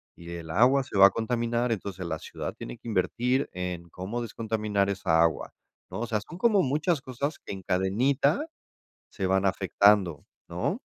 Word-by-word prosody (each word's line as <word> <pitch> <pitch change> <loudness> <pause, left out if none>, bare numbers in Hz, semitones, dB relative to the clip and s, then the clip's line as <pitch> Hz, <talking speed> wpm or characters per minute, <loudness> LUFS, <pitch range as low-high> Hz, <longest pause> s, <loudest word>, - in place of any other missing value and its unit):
y 85 0 -10
el 85 -2 -7
agua 130 - +4
se 130 -6 -5
va 95 0 +10
a - - +2
contaminar. 115 +2 -1
Entonces, 95 -4 -4
la 80 -2 -3
ciudad - - -6
tiene - - -8
que - - -13
invertir 120 +6 0
en 90 -1 -5
cómo 100 +8 -5
descontaminar 110 -3 -1
esa 80 -4 +2
agua, 85 -1 +1 0.4
¿no? - - -5
O 120 - -2
sea, 110 -2 0
son 170 +11 -11
como 210 0 +4
muchas 150 +2 0
cosas 140 +3 -4
que - - -7
en 95 -1 -8
cadenita 125 - +1 0.6
se 95 - -4
van 95 +1 +2
afectando, 95 -3 +3 0.2
¿no? - - -2
105 Hz, 175 wpm, -27 LUFS, 95-125 Hz, 0.6 s, va